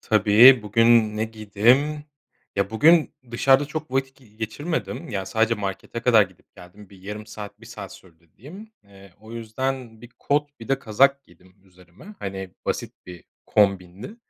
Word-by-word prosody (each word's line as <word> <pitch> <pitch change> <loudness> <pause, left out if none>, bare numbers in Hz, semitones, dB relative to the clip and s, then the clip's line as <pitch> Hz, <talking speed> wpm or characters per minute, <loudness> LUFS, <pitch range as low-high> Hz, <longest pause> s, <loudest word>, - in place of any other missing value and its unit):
Tabii, 110 +4 +6
bugün 110 0 +3
ne 110 - 0
giydim? 115 +8 +1 0.5
Ya, 100 0 0
bugün 155 +8 +4 0.2
dışarıda 135 +4 +3
çok 155 0 -6
vakit 135 0 -2
g 130 - -21
geçirmedim. 115 +11 -5
Ya, 100 -5 -4
sadece 115 +1 +1
markete 100 +2 -5
kadar 115 -3 +5
gidip 95 -3 -11
geldim. 95 +3 -15
Bir 95 -2 -17
yarım 105 +2 -7
saat, 105 -1 -10
1 115 - -14
saat 100 -4 -9
sürdü 85 -3 -19
diyeyim. 190 - -12
Eee, 100 -1 -18
o 110 +1 -13
yüzden 115 +1 -5
bir 120 - -12
kot 145 -2 -2
bir 115 - -11
de 135 - +1
kazak 140 +6 +2
giydim 90 +2 -23
üzerime. 90 - -17
Hani, 95 -1 -6 0.2
basit - - -3
bir 90 -3 -11 0.2
kombindi. 100 - 0
110 Hz, 160 wpm, -23 LUFS, 100-135 Hz, 0.5 s, Tabii